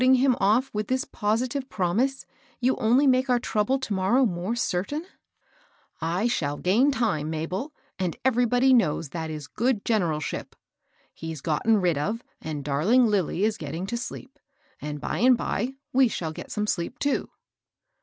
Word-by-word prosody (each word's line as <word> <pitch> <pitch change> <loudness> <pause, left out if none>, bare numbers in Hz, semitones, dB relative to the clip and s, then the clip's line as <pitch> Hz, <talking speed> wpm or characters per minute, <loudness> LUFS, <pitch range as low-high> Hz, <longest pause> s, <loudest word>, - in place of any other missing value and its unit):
836 260 +1 +6
ting 265 - +3
him 255 -3 +3
oflF 220 +7 +2
with 210 0 -2
this 260 0 0
positive 245 +5 -1
promise, 220 +9 0 0.3
you 255 +1 +2
only 245 +6 +3
make 260 0 +3
our 250 - +4
trouble 235 +2 0
to 260 -5 -4
morrow 200 +8 +3
more 185 +2 -2
certain? 240 - -2 0.5
" - - -35 0.2
"I 205 - +1
shall 145 -11 -1
gain 225 +10 +3
time, 155 - 0
Mabel, 180 - -3 0.3
and 180 -3 -2
everybody 245 +1 +4
knows 165 - +2
that 160 +1 -4
is 155 -2 -6
good 235 - -1
generalship. 170 -9 -1 0.6
He's 160 -3 -7
gotten 205 +8 +2
rid 175 -6 +1
of; 215 +10 -2 0.2
and 150 -3 -5
darling 180 - +3
Lilly 200 -3 +1
is 215 0 +1
getting 160 +4 -4
to 205 - -3 0.2
deep; 265 - -11 0.4
and, 150 0 -5
by - - -3
and 250 +1 +5
by, 245 +5 -2 0.2
we 260 0 +5
shall 170 -7 -3
get - - -9
some 210 -1 -1
sleep, 175 -5 -2
too." 285 -1 -1
215 Hz, 170 wpm, -26 LUFS, 170-255 Hz, 0.6 s, 836